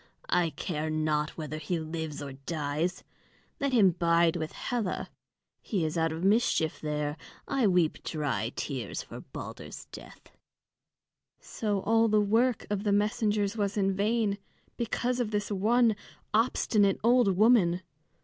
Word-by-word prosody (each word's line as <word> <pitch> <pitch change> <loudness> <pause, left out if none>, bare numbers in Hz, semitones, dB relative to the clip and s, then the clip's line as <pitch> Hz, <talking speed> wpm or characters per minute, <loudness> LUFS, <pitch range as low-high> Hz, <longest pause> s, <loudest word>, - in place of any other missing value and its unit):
"I 175 -2 +3
care 155 +1 -3
not 155 -1 0
whether 155 -1 -5
he 170 +3 -2
lives 160 -2 -5
or 140 -1 -6
dies. 150 +5 -3 0.6
Let 280 -1 0
him 210 -7 +5
bide 170 0 +3
with 155 0 -3
Hela 230 -7 -3 0.5
he 190 -8 -1
is 155 - -2
out 165 -1 +1
of 160 +2 -5
mischief 195 -6 +2
there. 150 0 -2 0.3
I 260 -5 +2
weep 180 -4 +2
dry 135 -8 -2
tears 130 -7 -4
for - - -9
Balder's - - -8
death." - - -12 1.1
So 205 -3 -2
all 225 +2 +3
the 215 -1 +3
work 225 +4 +2
of 205 -1 -1
the 205 - +1
messengers 210 0 +1
was 205 -1 -1
in 195 -1 +2
vain, 210 0 +1 0.4
because 245 +1 -1
of 240 -3 0
this 210 -1 -2
one 220 +3 +3 0.4
obstinate 210 -3 +2
old 235 -5 +4
woman. 195 -5 +4
195 Hz, 140 wpm, -29 LUFS, 155-215 Hz, 1.1 s, him